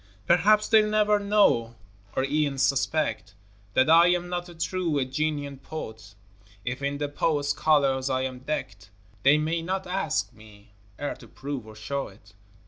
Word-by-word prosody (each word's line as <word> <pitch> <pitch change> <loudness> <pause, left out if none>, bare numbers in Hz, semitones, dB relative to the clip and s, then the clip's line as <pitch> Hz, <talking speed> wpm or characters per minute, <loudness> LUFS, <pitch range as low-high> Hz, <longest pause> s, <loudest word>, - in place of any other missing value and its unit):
Perhaps 210 - +4
they'll 215 -1 +5
never 210 -1 +3
know 200 - +2 0.4
or 130 - +1
e'en 145 0 0
suspect 135 - 0 0.4
That 130 - +4
I 165 +2 +7
am 175 0 +1
not 175 0 -4
a 175 - -12
true, 165 -1 -1
a 135 - +1
genuine 145 0 -3
poet; 110 -9 -8 0.5
If 125 +2 -3
in 140 +1 -2
the 145 0 -2
poet's 145 0 0
colors 140 -4 +2
I 130 -1 0
am 130 -1 -4
decked 115 -7 -5 0.3
They 140 +5 +5
may 160 +2 -1
not 190 +3 -3
ask 185 -7 -1
me 105 -1 -17 0.3
e'er 145 - -2
to - - -14
prove 135 -5 -6
or 110 - -11
show 135 +6 -4
it. 100 +1 -18
145 Hz, 165 wpm, -26 LUFS, 130-170 Hz, 0.5 s, I